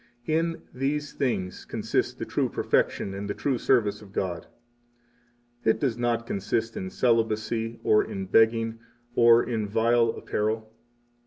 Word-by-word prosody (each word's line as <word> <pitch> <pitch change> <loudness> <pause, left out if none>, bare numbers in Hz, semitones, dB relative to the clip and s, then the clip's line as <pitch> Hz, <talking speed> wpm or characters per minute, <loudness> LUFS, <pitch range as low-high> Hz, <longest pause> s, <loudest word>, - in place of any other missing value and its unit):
In 165 +1 0
these 145 +3 -2
things 95 -9 -2
consist - - -1
the - - -4
true - - 0
perfection 95 - 0
and 100 +1 -5
the 100 - -2
true 135 -4 -1
service 105 -5 +2
of 100 -2 -14
God. 85 -5 -3 1.2
It 110 - +2
does 130 -6 0
not 120 -1 0
consist 110 +3 -2
in 95 - -4
celibacy, 115 0 0
or 105 - +4
in 95 -1 -5
begging, 115 +2 +3 0.4
or 115 0 +6
in 110 -3 -2
vile 115 +2 +3
apparel. 110 0 -2
115 Hz, 140 wpm, -26 LUFS, 105-120 Hz, 1.2 s, or